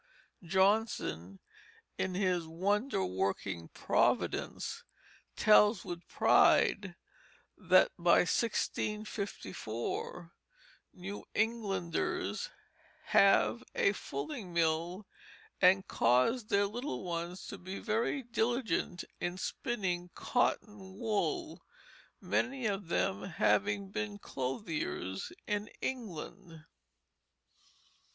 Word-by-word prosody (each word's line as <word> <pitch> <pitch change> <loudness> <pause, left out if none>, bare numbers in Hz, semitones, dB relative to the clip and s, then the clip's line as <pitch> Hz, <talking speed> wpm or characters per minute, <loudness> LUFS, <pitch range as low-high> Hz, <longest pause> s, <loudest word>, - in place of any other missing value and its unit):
Johnson 190 - +1 0.6
in 185 -1 -2
his 180 -3 +1
Wonder 200 - 0
working 95 -2 -2
Providence - - 0 0.5
tells 210 0 +5
with 175 0 -6
pride - - +4 0.6
that 185 -1 +4
by 170 0 +5
1654 195 - -2 0.6
New 195 +3 -7
Englanders 230 - -1 0.6
"have - - +5
a - - +4
fulling 280 - -5
mill 170 +3 0 0.6
and 190 +1 +5
caused 130 - +2
their 200 0 +3
little 245 +7 -4
ones 175 +1 -4
to - - -7
be 190 +2 -6
very 230 +5 -1
dilligent 230 -6 -1 0.2
in 175 +1 -2
spinning 180 -4 -2
cotton 205 -6 -1
woole, 315 - -1 0.6
many 260 -1 -1
of 200 -3 -1
them 100 - 0
having 200 - +1
been 210 0 -3
clothiers 135 - -3
in 210 0 -2
England." 180 -8 -6
195 Hz, 85 wpm, -33 LUFS, 170-220 Hz, 0.6 s, tells